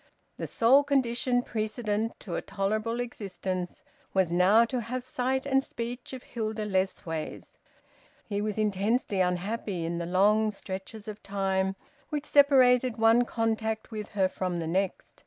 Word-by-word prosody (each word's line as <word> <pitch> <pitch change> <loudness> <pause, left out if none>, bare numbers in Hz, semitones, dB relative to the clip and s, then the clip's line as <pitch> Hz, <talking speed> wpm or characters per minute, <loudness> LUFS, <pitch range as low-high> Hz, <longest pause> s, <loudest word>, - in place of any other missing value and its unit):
The - - -4
sole 260 +5 +5
condition 250 -2 +1
precedent 220 0 -2
to 180 - -7
a - - -1
tolerable 215 +4 -1
existence 185 -6 -4 0.3
was 190 -3 +3
now 190 +6 +5
to 250 +2 -2
have 250 +3 -4
sight 255 +1 -1
and 270 -1 +2
speech 240 +1 -6
of 260 -2 -7
Hilda 220 -2 -3
Lessways. 185 -5 -3 0.7
He 205 -1 -2
was 210 0 -2
intensely 210 0 +1
unhappy 180 0 -1
in 170 +1 -2
the 170 - -3
long 210 +4 +3
stretches 205 +2 -7
of 210 -1 -7
time 190 -1 0 0.3
which 300 -1 -3
separated 255 -4 +5
one 225 +2 +5
contact 220 -1 -1
with 215 -1 -5
her 190 -1 +4
from 185 -1 -3
the 165 - -3
next. 185 +3 -2
215 Hz, 145 wpm, -28 LUFS, 190-240 Hz, 0.7 s, sole